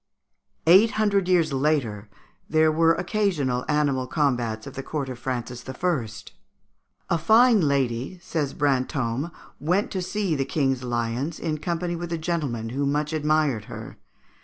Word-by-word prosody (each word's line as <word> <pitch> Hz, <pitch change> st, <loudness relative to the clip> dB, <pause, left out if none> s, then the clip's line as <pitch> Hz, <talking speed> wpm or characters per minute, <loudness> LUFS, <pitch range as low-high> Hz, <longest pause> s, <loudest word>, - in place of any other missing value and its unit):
Eight 190 Hz, +7 st, +7 dB
hundred 200 Hz, -3 st, +2 dB
years 170 Hz, -5 st, +3 dB
later 130 Hz, -8 st, 0 dB, 0.4 s
there 155 Hz, 0 st, +4 dB
were 165 Hz, +1 st, +4 dB
occasional 175 Hz, -, 0 dB
animal 140 Hz, -4 st, +1 dB
combats 120 Hz, -7 st, 0 dB
at 135 Hz, -, -8 dB
the 135 Hz, -, -5 dB
court 140 Hz, -1 st, -4 dB
of 125 Hz, -2 st, -7 dB
Francis 120 Hz, -1 st, -4 dB
I. 130 Hz, -4 st, -1 dB, 1.0 s
"A 170 Hz, -, +2 dB
fine 225 Hz, +5 st, +5 dB
lady," 135 Hz, +1 st, 0 dB
says 155 Hz, -5 st, -3 dB
Brantôme, 135 Hz, 0 st, 0 dB, 0.3 s
"went 180 Hz, +9 st, 0 dB
to 190 Hz, -, -2 dB
see 195 Hz, -1 st, -1 dB
the 140 Hz, -3 st, 0 dB
King's 135 Hz, -3 st, 0 dB
lions, 120 Hz, +6 st, -2 dB
in 155 Hz, -2 st, -2 dB
company 170 Hz, +2 st, -2 dB
with 170 Hz, 0 st, -5 dB
a 170 Hz, -, 0 dB
gentleman 150 Hz, -9 st, -2 dB
who 140 Hz, +4 st, -1 dB
much 150 Hz, +2 st, -1 dB
admired 150 Hz, -7 st, +1 dB
her. -, -, -9 dB
150 Hz, 145 wpm, -25 LUFS, 130-170 Hz, 1.0 s, Eight